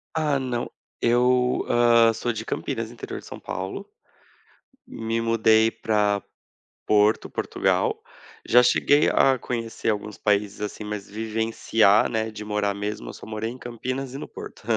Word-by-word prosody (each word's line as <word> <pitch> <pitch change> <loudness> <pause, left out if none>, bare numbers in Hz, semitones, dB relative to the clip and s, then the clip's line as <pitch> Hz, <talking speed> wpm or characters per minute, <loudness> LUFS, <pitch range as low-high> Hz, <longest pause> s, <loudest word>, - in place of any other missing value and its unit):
Ah, 150 -3 +1
não, 125 -2 -3 0.3
eu 125 +1 +2
ah, 115 -1 +5
sou 120 +2 -2
de 110 0 -5
Campinas, 115 -1 -3
interior 120 - -7
de - - -15
São - - -9
Paulo. 95 +1 -6 1.0
Me 115 0 -3
mudei 115 -1 +3
para 105 -3 0 0.7
Porto, 105 0 +3
Portugal. - - 0 0.5
Já 125 +1 +6
cheguei 145 +4 +4
a 135 -1 +4
conhecer 115 -2 -4
alguns 105 -1 -4
países 105 -1 0
assim, 105 +1 -5
mas 105 -1 -5
vivenciar, 110 -1 +2
né? 110 -1 -2
De 105 -1 -8
morar 105 -1 -1
mesmo, 105 +1 -5
eu - - -6
só - - -12
morei 110 +1 -4
em 125 - -9
Campinas 130 +2 -5
e - - -5
no - - -7
Porto. - - -10
115 Hz, 150 wpm, -24 LUFS, 105-120 Hz, 1.0 s, Já